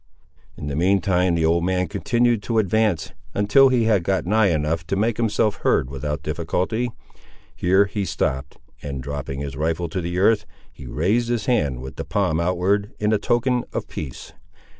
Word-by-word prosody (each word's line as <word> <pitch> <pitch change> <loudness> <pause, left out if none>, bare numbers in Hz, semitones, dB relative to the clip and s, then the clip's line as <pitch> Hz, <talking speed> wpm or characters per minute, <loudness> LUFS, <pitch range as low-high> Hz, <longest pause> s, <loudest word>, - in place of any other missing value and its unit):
In - - -6
the 70 -1 -3
mean 95 +5 +3
time 90 -2 +1
the 80 -1 +1
old 85 +1 +2
man 90 0 0
continued 120 +2 +1
to 115 +1 -2
advance, 100 -6 +1 0.2
until 105 +7 +5
he 125 -3 +2
had 110 -4 +3
got 95 +2 0
nigh 105 +3 +3
enough 80 -1 0
to 100 - 0
make 110 +3 0
himself 110 -2 +1
heard 65 -8 +1
without 75 +2 -4
difficulty. 90 +9 -1 0.7
Here 95 +3 +3
he 100 0 -3
stopped, 65 -6 -2 0.2
and 70 -3 -5
dropping 70 0 -5
his 70 -2 -5
rifle 80 +3 -1
to 90 +3 -3
the 85 +1 -3
earth, 105 +2 +3 0.3
he - - -11
raised 110 +10 0
his 120 -3 -1
hand 70 - 0
with 65 0 -9
the - - -3
palm 80 +1 0
outward, 90 +4 0
in 105 0 0
token 120 +2 +1
of - - -3
peace. 70 -5 -7
95 Hz, 180 wpm, -22 LUFS, 80-110 Hz, 0.7 s, until